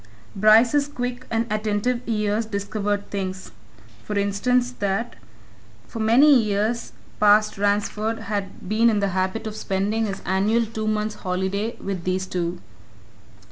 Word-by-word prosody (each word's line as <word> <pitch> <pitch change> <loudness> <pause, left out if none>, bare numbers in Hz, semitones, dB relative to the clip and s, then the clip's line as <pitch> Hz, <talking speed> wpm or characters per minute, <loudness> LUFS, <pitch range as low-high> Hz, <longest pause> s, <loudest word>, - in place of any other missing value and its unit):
Bryce's 225 +8 +5
quick 250 -2 -5
and 230 0 0
attentive 215 +3 0
ears 215 0 0
discovered 205 0 -3
things 190 -1 -4 0.5
for 210 - -3
instance 240 +5 +1
that 205 +4 -1 0.7
for 230 - -7
many 250 +5 +6
years 215 +2 -1 0.3
past 210 0 +4
Ransford 210 +2 0
had 200 -3 -5
been 220 +4 +3
in 215 -2 +1
the 200 -1 +1
habit 190 +4 -2
of 215 -1 -5
spending 210 +3 -1
his 195 -1 -5
annual 210 +5 +2
two 220 0 -4
months' 215 0 -1
holiday 190 +4 -2
with 190 -3 -5
these 185 +1 -1
two. 175 -1 -3
210 Hz, 135 wpm, -23 LUFS, 200-225 Hz, 0.7 s, many